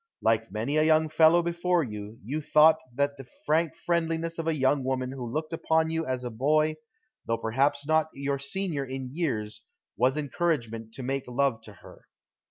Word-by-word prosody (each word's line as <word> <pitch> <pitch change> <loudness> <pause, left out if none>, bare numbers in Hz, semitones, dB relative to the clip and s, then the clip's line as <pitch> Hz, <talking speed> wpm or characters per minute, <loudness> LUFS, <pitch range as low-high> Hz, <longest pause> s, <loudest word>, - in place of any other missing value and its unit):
Like 110 -1 +1
many 115 +8 -1
a 155 - +4
young 155 0 +3
fellow 160 +2 +5
before 170 0 +1
you, 105 -2 -7
you 145 +9 -3
thought 155 +2 +6 0.2
that 140 +1 0
the 135 -2 -11 0.2
frank 160 +2 +1
friendliness 165 -1 -1
of 165 - -3
a 165 - +1
young 135 0 +2
woman 130 -1 -1
who 125 -3 -6
looked 155 +3 -3
upon 160 0 +1
you 165 0 -2
as 130 -1 -2
a 120 - -4
boy, 155 +6 +1 0.5
though 115 - +1
perhaps 140 +6 0
not 155 +1 +2
your 140 0 -2
senior 155 +1 -3
in 130 -1 -6
years, 115 -11 -2 0.3
was 130 +4 +2
encouragement 120 -7 -2
to 130 - -7
make 135 +1 -2
love 125 -2 0
to 105 - -12
her. - - -15
140 Hz, 180 wpm, -27 LUFS, 125-160 Hz, 0.5 s, thought